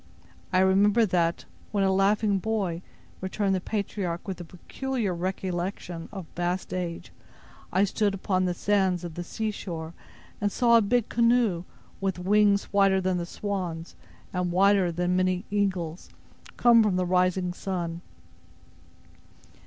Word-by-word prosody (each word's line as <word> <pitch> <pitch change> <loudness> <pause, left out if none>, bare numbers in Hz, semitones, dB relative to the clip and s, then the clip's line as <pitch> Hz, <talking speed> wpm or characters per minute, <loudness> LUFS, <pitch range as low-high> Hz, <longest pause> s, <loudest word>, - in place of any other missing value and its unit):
"I 185 -1 +4
remember, 200 +4 +4
that 170 -3 0 0.3
when 200 -2 +1
a 190 0 +3
laughing 200 +1 +2
boy," 190 -5 -2 0.4
returned 195 +1 0
the 185 - 0
patriarch, 195 -3 -3
with 190 -2 -4
the 175 - -7
peculiar 215 +5 -3
recollection 175 -1 -4
of 195 -4 -7
vast 175 +1 -2
age, 175 -2 -4 0.6
"I 190 +2 +3
stood 205 0 +1
upon 185 -1 0
the 180 -1 -1
sands 190 -2 +1
of 170 -2 -6
the 175 - -5
sea 220 +5 -3
shore, 165 -5 -6 0.5
and 205 0 +1
saw 235 +1 +4
a 230 - +7
big 235 +2 +1
canoe, 230 -7 +2 0.3
with 195 -2 -1
wings 200 +2 +3
whiter 195 -1 +4
than 185 -1 0
the 170 - -4
swan's, 180 -5 -4 0.4
and 180 -1 -1
wider 190 0 +4
than 175 +2 0
many 185 +1 +1
eagles, 185 -5 -1 0.5
come 235 -1 +6
from 210 -4 +2
the 185 0 +1
rising 180 0 +1
sun." 175 -3 -4
190 Hz, 145 wpm, -27 LUFS, 175-205 Hz, 0.6 s, a